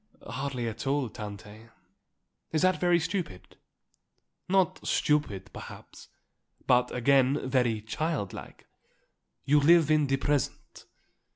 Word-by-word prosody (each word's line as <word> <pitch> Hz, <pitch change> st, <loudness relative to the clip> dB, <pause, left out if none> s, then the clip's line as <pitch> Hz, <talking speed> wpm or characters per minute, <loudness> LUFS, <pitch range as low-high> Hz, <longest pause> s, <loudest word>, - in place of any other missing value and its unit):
"Hardly 130 Hz, 0 st, -4 dB
at 115 Hz, +4 st, -5 dB
all, 135 Hz, -3 st, 0 dB
Tante. 105 Hz, +1 st, -10 dB, 0.8 s
Is 160 Hz, +2 st, 0 dB
that 185 Hz, 0 st, +3 dB
very 175 Hz, -1 st, +3 dB
stupid?" 165 Hz, -, -5 dB, 0.9 s
"Not 190 Hz, -2 st, +2 dB
stupid, 145 Hz, -11 st, 0 dB
perhaps; -, -, -11 dB, 0.6 s
but, 125 Hz, 0 st, +3 dB
again, 135 Hz, +2 st, +2 dB
very 125 Hz, -5 st, +1 dB
child 115 Hz, -, -3 dB
like. -, -, -11 dB, 0.8 s
You 145 Hz, +2 st, +4 dB
live 160 Hz, +1 st, +5 dB
in 150 Hz, -2 st, +3 dB
the 135 Hz, 0 st, +1 dB
present." 145 Hz, -1 st, -3 dB
135 Hz, 110 wpm, -28 LUFS, 115-155 Hz, 0.9 s, live